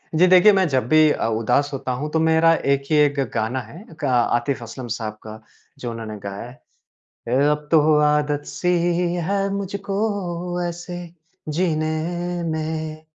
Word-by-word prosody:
जी 180 +3 +5
देखिए 185 +3 +7
मैं 190 -2 +3
जब 130 -3 0
भी 155 +1 +5
अ, - - -1
उदास 115 +6 +1
होता 135 -1 -3
हूँ 145 +5 -3
तो 160 - +1
मेरा 160 +1 +4 0.2
एक 140 0 -1
ही - - +4
एक 145 -1 +3
गाना 115 +4 -1
है 150 - -12 0.2
का 140 -4 -1 0.2
आतिफ़ 120 +1 -2
असलम 120 +2 -8
साहब 110 -2 -4
का, 110 0 -9 0.4
जो 120 -2 -4
उन्होंने 110 -2 -6
गाया 100 +1 -6
है। 125 - -16 0.7
ए, 135 +4 +3
अब 150 0 -2
तो 155 -1 +5
आदत 150 -1 +1
सी 180 - -3 0.6
है 200 0 0
मुझको 195 -3 -3
ऐसे 175 +1 -6 0.5
जीने 155 -1 0 0.6
में। 155 0 -4
155 Hz, 160 wpm, -22 LUFS, 130-175 Hz, 0.7 s, देखिए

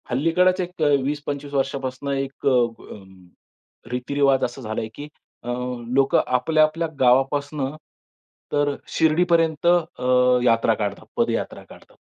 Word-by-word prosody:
हल्लीकडचे 180 +8 +2
एक 175 -1 -9
अ, - - +4 0.2
20-25 145 0 -4
वर्षांपासून 135 0 -2
एक 135 0 -5
अ, - - +7
अ, 120 -5 -1 0.9
रीतिरिवाज 135 +2 +1
असा 120 +3 -3
झालाय, 110 -1 -4
की 145 - -8 0.4
अ, - - -11 0.5
लोकं 135 0 +4
आपल्या, 155 +5 +2
आपल्या 165 +2 0
गावापासून, 135 +3 +2 0.9
तर 145 0 +1
अ, - - -7 0.2
शिर्डीपर्यंत 165 -1 +2
अ, 125 -7 +3
यात्रा 115 -1 +3
काढतात, 100 -2 -4
पदयात्रा - - -1
काढतात. - - -17
140 Hz, 125 wpm, -22 LUFS, 125-155 Hz, 0.9 s, अ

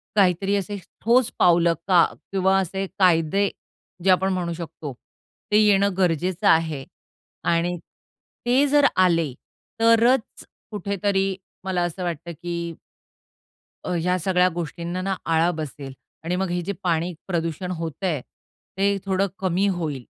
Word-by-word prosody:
काहीतरी 195 0 +3
असे 200 +1 -2 0.2
ठोस 235 +2 +3
पावलं 170 -1 +5
का 180 -3 +6 0.3
किंवा 190 0 +3
असे 195 +1 -2
कायदे 180 +2 +3 0.5
जे 190 - +2
आपण 190 +1 +3
म्हणू 175 -2 -2
शकतो 160 -4 -7 0.6
ते 210 - +5
येणं 200 -1 +4
गरजेचं 180 +2 +1
आहे 160 -4 +3 0.7
आणि 175 +1 0 0.7
ते 255 +4 +4
जर 290 0 +4
आले 165 -7 +3 0.5
तरच 230 +2 +3 0.3
कुठेतरी 200 -2 -1 0.3
मला 185 -2 -1
असं 175 +2 -3
वाटतं 170 0 -4
की 170 0 -5 1.1
अ, - - -5
ह्या 180 +2 +1
सगळ्या 180 +1 +3
गोष्टींना 170 +2 -4
ना 195 +1 -1
आळा 165 +1 +3
बसेल 140 -3 -6 0.3
आणि 175 +2 -1
मग 190 -1 -1
हे 175 0 -1
जे 200 - -2
पाणी 170 0 0
प्रदूषण 170 0 -2
होतं 165 +1 -4
आहे, 150 -7 -1 0.6
ते 200 +1 +2
थोडं 195 +1 +1
कमी 190 +1 +1
होईल. 155 -9 -2
180 Hz, 135 wpm, -23 LUFS, 170-195 Hz, 1.1 s, का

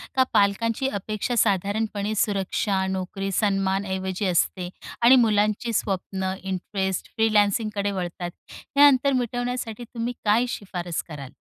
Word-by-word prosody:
का 260 - +5
पालकांची 225 +5 +2
अपेक्षा 215 +3 -3
साधारणपणे 205 0 0
सुरक्षा, 195 -1 0
नोकरी, 190 +1 -3
सन्मान 195 -1 +1
ऐवजी 190 +1 -2
असते 180 0 0 0.3
आणि 240 +3 +8
मुलांची 215 -1 +2
स्वप्नं 190 -1 -2
इंटरेस्ट 190 0 -3
फ्रीलान्सिंगकडे 210 -1 +2
वळतात. 175 -2 -4 0.2
हे 285 0 -2
अंतर 275 0 +3
मिटवण्यासाठी 245 -2 -2
तुम्ही 235 +1 -4
काय 215 +4 +4
सिफारिश 175 -4 -4
कराल? 140 -5 -8
205 Hz, 115 wpm, -24 LUFS, 190-225 Hz, 0.3 s, आणि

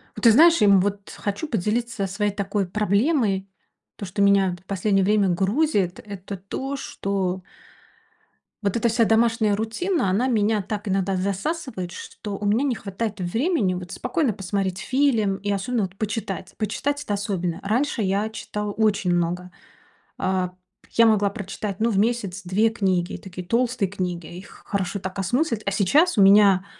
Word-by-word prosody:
Вот, - - -9
ты 230 - +8
знаешь, 330 +6 +6
и, - - +6
м, 200 -2 +6
вот 200 +1 -3
хочу 205 +10 -3
поделиться 220 -2 -1
своей 205 +2 -1
такой 200 -1 -2
проблемой, 210 - +1 0.5
то, 200 - -6
что 185 +2 -3
меня, 200 -2 +4
это, 175 0 -11
в - - -45
последнее 195 0 +1
время 205 0 +3
грузит, 195 - +1
это 200 -1 -7
то, 265 +9 -5
что 190 -7 -3 1.2
вот 200 -2 0
эта 235 0 +2
вся 230 +1 +3
домашняя 225 -1 +3
рутина, 225 - -1
она 210 +8 +1
меня 215 -3 +2
так 205 +1 -5
иногда 195 0 0
засасывает, 200 - -3
что 450 - -7
у 205 - -5
меня 220 +7 +2
не 260 -4 0
хватает 205 0 -4
времени, 225 - +1
вот, 180 0 -6
спокойно 250 -2 0
посмотреть 195 -1 -2
фильм, 230 -7 +1
и 205 +1 -5
особенно, 205 +3 0
вот, 190 0 -5
почитать. 200 -4 -4
Почитать- 285 +7 -2
это 210 - -3
особенно. 190 -4 -2
Раньше 240 +5 0
я 200 +2 0
читала 210 -1 -5
очень 205 -4 +1
много. 175 +1 -1 0.7
Э, 185 -1 0 0.4
я 230 - +5
могла 205 -2 +3
прочитать, 200 0 -5
ну, 230 - +3
в 200 - 0
месяц 205 -4 0
2 195 +5 +2
книги, 190 -5 0
такие 180 -2 -9
толстые 235 -1 +1
книги, 180 -3 -4
их 185 - -13
хорошо 200 0 -2
так 190 +1 -6
осмыслить. 230 - 0
А - - 0
сейчас 235 - +3
у - - +7
меня, 195 -1 +6
205 Hz, 165 wpm, -23 LUFS, 190-225 Hz, 1.2 s, ты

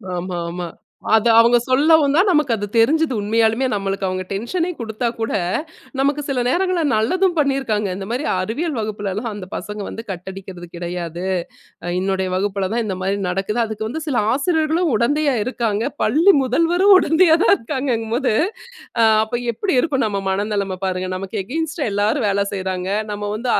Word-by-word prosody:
ஆமா 175 0 -4
ஆமா. 175 0 -5 0.5
அத 220 +1 +2
அவங்க 235 +1 +6
சொல்லவும்தான் 300 +5 +4
நமக்கு 300 -7 +2
அது 205 -1 -3
தெரிஞ்சது 300 +5 +3
உண்மையாலுமே, 225 +4 +2
நமக்கு 195 -1 -2
அவங்க 185 0 -2
டென்ஷனே 330 - -2
குடுத்தா 225 +1 -3
கூட, 225 - -2 0.7
நமக்கு 285 +2 +1
சில 270 -2 0
நேரங்கள்ல 360 +4 +1
நல்லதும் 350 - +1
பண்ணிருக்காங்க. 265 -8 0
இந்த 195 0 -6
மாரி 250 +5 -2 0.2
அறிவியல் 285 - -2
வகுப்புலலாம் 210 +1 -3
அந்தப் 195 -2 -8
பசங்க 210 0 -5
வந்து 225 - -7
கட் 180 -1 -8
அடிக்கிறது 185 -2 -9
கிடையாது. 175 0 -5 0.8
என்னுடைய 190 0 -1
வகுப்புல 195 0 -1
தான் 235 0 0
இந்த 190 -3 -3
மாரி 195 +2 0
நடக்குது. 195 +5 -2
அதுக்கு 220 0 -4
வந்து 320 +7 -4
சில 270 -5 0 0.2
ஆசிரியர்களும் 320 +3 +1
உடந்தையா 285 +5 +1
இருக்காங்க, 230 -4 -1 0.2
பள்ளி 340 +7 +5
முதல்வரும் 345 - +4
உடந்தையா 325 0 +4
தான் - - +6
இருக்காங்கங்கும்போது, 235 -1 -1 0.7
அ - - +6 0.2
அப்ப 240 +2 -3
எப்டி 380 - -1
இருக்கும் 275 -3 0
நம்ம 200 -2 -2
மனநெலம 200 -1 -1
பாருங்க. 185 0 -2
நமக்கு 195 +2 -4
அகைன்ஸ்ட்டா 305 - -2
எல்லாரும் 210 +4 +1
வேலை 200 0 +1
செய்றாங்க. 185 -1 -3 0.2
நம்ம 205 0 -5
வந்து 240 +3 -2
225 Hz, 155 wpm, -20 LUFS, 195-290 Hz, 0.8 s, அவங்க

